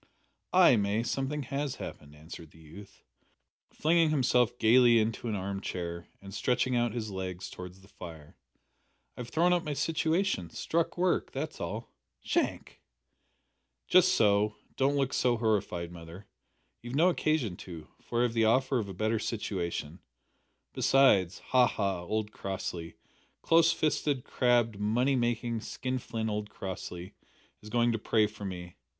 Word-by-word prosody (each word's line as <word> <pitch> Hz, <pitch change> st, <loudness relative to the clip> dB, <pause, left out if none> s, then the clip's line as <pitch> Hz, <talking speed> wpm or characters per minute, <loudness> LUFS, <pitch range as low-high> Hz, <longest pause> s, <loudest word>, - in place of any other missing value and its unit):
"Ay, -, -, +6 dB
May, 105 Hz, +2 st, 0 dB
something 135 Hz, +4 st, -2 dB
has 140 Hz, +1 st, -3 dB
happened," 75 Hz, 0 st, -9 dB
answered 80 Hz, +1 st, -11 dB
the 80 Hz, -, -20 dB
youth, 90 Hz, +6 st, -14 dB, 0.7 s
flinging 165 Hz, 0 st, +2 dB
himself 125 Hz, -4 st, +2 dB
gaily 120 Hz, +1 st, +6 dB
into 115 Hz, +1 st, -1 dB
an 110 Hz, -, -1 dB
arm 95 Hz, 0 st, -4 dB
chair 85 Hz, -2 st, -5 dB
and 100 Hz, 0 st, -11 dB
stretching 125 Hz, +3 st, 0 dB
out 120 Hz, -1 st, +1 dB
his 110 Hz, -3 st, -4 dB
legs 95 Hz, -1 st, -5 dB
towards 90 Hz, +1 st, -9 dB
the 95 Hz, -, -18 dB
fire; 80 Hz, -6 st, -11 dB, 0.8 s
"I -, -, -14 dB
have 120 Hz, -1 st, -6 dB
thrown 175 Hz, +2 st, +3 dB
up 175 Hz, -1 st, +1 dB
my 150 Hz, -, -3 dB
situation. 160 Hz, -, 0 dB
Struck 165 Hz, -, -1 dB
work. 180 Hz, 0 st, +1 dB
That's 150 Hz, +3 st, -5 dB
all." 105 Hz, +7 st, -5 dB, 0.3 s
"Shank!" -, -, -2 dB, 1.1 s
"Just 185 Hz, +1 st, +5 dB
so. 105 Hz, 0 st, +3 dB, 0.2 s
Don't 135 Hz, +2 st, +2 dB
look 135 Hz, -1 st, 0 dB
so 120 Hz, -2 st, +2 dB
horrified, 100 Hz, -6 st, -1 dB
mother; 85 Hz, +3 st, -11 dB, 0.6 s
you've 120 Hz, +2 st, -6 dB
no 170 Hz, +5 st, +5 dB
occasion 155 Hz, -, 0 dB
to, 85 Hz, -4 st, -9 dB
for 120 Hz, -, -2 dB
I -, -, +4 dB
have 120 Hz, -2 st, 0 dB
the 115 Hz, -1 st, +2 dB
offer 130 Hz, +3 st, +2 dB
of 100 Hz, -3 st, -4 dB
a 95 Hz, -, -7 dB
better 110 Hz, +3 st, 0 dB
situation. 90 Hz, -7 st, -3 dB, 0.7 s
Besides 100 Hz, -10 st, +4 dB
ha! 125 Hz, -1 st, +5 dB
ha! 100 Hz, -5 st, -2 dB
old 105 Hz, +4 st, -2 dB
Crossley 90 Hz, -4 st, -5 dB, 0.5 s
close 165 Hz, 0 st, +5 dB
fisted, 150 Hz, -5 st, 0 dB
crabbed, 120 Hz, -4 st, +1 dB
money 120 Hz, +6 st, +1 dB
making, 120 Hz, -1 st, -1 dB
skin 130 Hz, +2 st, -3 dB
flint 115 Hz, -2 st, -4 dB
old 105 Hz, 0 st, -3 dB
Crossley 95 Hz, -2 st, -7 dB, 0.5 s
is 105 Hz, -, -11 dB
going 120 Hz, +1 st, +2 dB
to 115 Hz, -, -2 dB
pray 110 Hz, 0 st, +2 dB
for 105 Hz, -1 st, -7 dB
me. 90 Hz, -2 st, -7 dB
110 Hz, 155 wpm, -30 LUFS, 95-130 Hz, 1.1 s, Ay